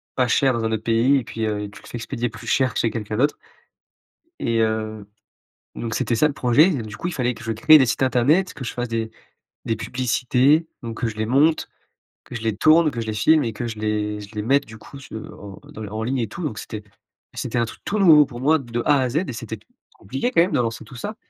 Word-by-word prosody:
pas 130 -1 +2
cher 135 +2 +3
dans 115 -1 -2
un 110 - -1
autre 110 -1 -2
pays 120 +4 +3
et - - -6
puis, 115 0 -4
heu, 105 -1 -2
tu - - -14
le - - -15
fais - - -8
expédier 120 +1 -3
plus 110 0 -11
cher 130 -2 +2
que - - -1
chez 115 - +1
quelqu'un 105 -2 -4
d'autre. 145 +5 +2 1.0
Et 115 -1 0
heu, 110 -1 -2 0.7
donc 115 -1 -4
c'était 120 - 0
ça, 135 +7 +3
le 150 - 0
projet, 130 +5 +4
et 145 -10 -1
du 110 0 -8
coup, 175 - -3
il - - -4
fallait 125 -5 -1
que 110 - -12
je 115 - -1
crée 120 +8 +7
des 135 - +5
sites 120 - -1
internet, 135 +9 +2
que 130 - -7
je - - -4
fasse 120 0 -3
des 115 -1 -2 0.5
des 115 - 0
publicités, 130 +6 +1
donc 115 -2 -6
que 120 - 0
je 110 - -7
les 110 0 -1
monte, 145 +7 +2 0.6
que - - -11
je 120 - -4
les 110 -2 -1
tourne, 155 +5 +5
que 120 - -5
je - - -6
les 110 - -2
filme 145 +8 +3
et 115 - -2
que 120 +3 -5
je 110 -2 -6
les 105 -1 -2
je 105 +1 -11
les 105 - -3
mette 135 +6 +2
du 115 0 -12
coup 140 - -12
su 140 - -12
en 100 -3 -9
dans 110 - -8
en 110 +2 -4
ligne 130 +3 -1
et 115 -3 -1
tout. 170 - -7
Donc 110 -9 -3
c'était 110 -1 -7 0.5
c'était 120 0 -3
un 120 - +2
truc 115 - -9
tout 210 - -1
nouveau, 160 -7 +7
pour 125 -4 -9
moi, 155 +5 +3
de 120 -3 -4
A 145 -2 +4
à 130 - +1
Z 125 - -4
et - - -3
c'était 115 -1 -6 0.4
compliqué, 135 - -2
quand 235 - +3
même, 180 +3 +2
de - - +2
lancer 115 -2 -3
tout - - -14
ça. 210 - -6
120 Hz, 265 wpm, -22 LUFS, 110-140 Hz, 1.0 s, crée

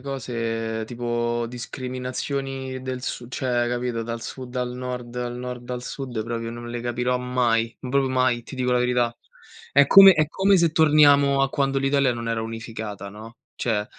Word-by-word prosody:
cose 115 -4 -3
tipo 120 0 -2
discriminazioni 130 +2 -5
del 130 -1 -5
su 120 -1 -5
cioè, 125 -1 -1
capito, 120 -1 -2
dal 115 0 -5
sud 130 +1 -8
al 125 -1 -1
nord, 125 -1 -6
al 120 0 -3
nord 125 0 -7
al 125 -1 -4
sud, 125 -4 -5
proprio 115 0 -4
non 120 0 -7
le 120 0 -4
capirò 125 +1 -1
mai, 120 -2 0
proprio 135 +1 0
mai, 130 -2 +1
ti - - -9
dico 125 -1 -1
la 125 - +3
verità. 125 -1 +1 0.6
È 140 +1 +7
come 195 -1 +10
è 155 -2 +1
come 195 +3 +3
se 170 -1 +3
torniamo 145 -3 +5
a 135 - +2
quando 135 -1 0
l'Italia 135 -2 +2
non 115 0 -5
era 115 -1 -1
unificata, 110 -3 -6
no. 110 +3 -12 0.2
Cioè, 105 -3 0
125 Hz, 170 wpm, -24 LUFS, 120-130 Hz, 0.6 s, come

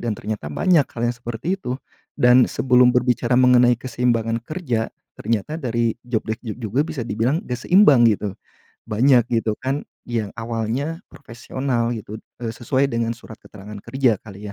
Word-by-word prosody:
dan 115 -3 -2
ternyata 105 -9 -5
banyak 165 - +3
hal 115 - -7
yang - - -15
seperti 120 - -3
itu. 125 -6 -3 0.4
Dan 125 +1 +5
sebelum 125 -1 +4
berbicara 125 0 +2
mengenai 125 -1 +5
keseimbangan 115 -2 -1
kerja 125 -10 -2 0.3
ternyata 115 +9 -2
dari 120 -3 0
job 120 -3 -2
desk 110 0 -4
ju 110 -4 -6
juga 120 +2 -1
bisa 135 -6 -5
dibilang 120 +8 0
nggak 125 -1 -4
seimbang 175 -10 +6
gitu, 105 -2 -1 0.5
banyak 120 +3 +4 0.2
gitu 110 -1 -2
kan 135 +2 -2 0.2
yang 115 -4 -2
awalnya 120 - -3
profesional 125 -1 -3
gitu 110 0 -8 0.2
e 115 -2 -4
sesuai 130 +4 0
dengan 115 -4 -1
surat 115 -2 -12
keterangan 105 +1 -11
kerja 130 -4 +1
kali 105 -1 -10
120 Hz, 155 wpm, -21 LUFS, 115-130 Hz, 0.5 s, seimbang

